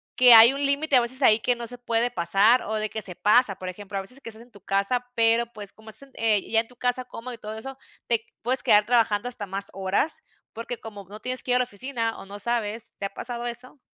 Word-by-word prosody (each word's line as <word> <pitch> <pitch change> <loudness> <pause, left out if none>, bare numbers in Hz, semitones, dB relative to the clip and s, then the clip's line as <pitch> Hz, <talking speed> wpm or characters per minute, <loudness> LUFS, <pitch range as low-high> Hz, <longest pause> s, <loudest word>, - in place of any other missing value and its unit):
que 250 -1 +8
hay 225 +2 +9
un 280 +1 -4
límite 280 0 +2
a - - +4
veces 255 +3 +2
ahí 220 -3 +5
que 245 +2 0
no 240 0 -7
se 245 +2 -2
puede 240 0 0
pasar, 200 +8 +3
o, 220 - -4
de 215 0 -1
que 220 - -4
se 185 -3 -1
pasa? 210 +1 +3
Por 185 -1 -7
ejemplo, 200 +2 -8
a - - -2
veces 250 +8 -5
que - - -9
estás 225 +1 -6
en 240 - -23
tu 205 - -16
casa, 200 +6 0
pero, 230 +1 +3
pues, 205 -2 -8
como 220 0 -16
estás 245 +6 -4
eh, 215 -3 +1
ya 225 - +4
en 225 - -2
tu 250 - -18
casa 245 +1 -1
cómodo 245 0 -9
y - - -8
todo 215 0 -8
eso, 270 +4 -8 0.3
te 230 -2 0 0.2
puedes 255 +3 +1
quedar 210 0 +4
trabajando 230 -1 +1
hasta 220 -5 -2
más 195 +1 0
horas, 195 - -1 0.3
porque 230 +1 -6
como 205 -3 -10
no 210 +2 -10
tienes 255 +2 0
que 250 - -4
ir 245 - +4
a - - +3
la 250 - +3
oficina, 230 0 -4
o, - - -10
no 200 +1 -9
sabes, 225 0 -2
¿te 200 - -3
ha 195 - -6
pasado 240 -1 -5
eso? 255 +4 -7
230 Hz, 265 wpm, -24 LUFS, 210-245 Hz, 0.3 s, hay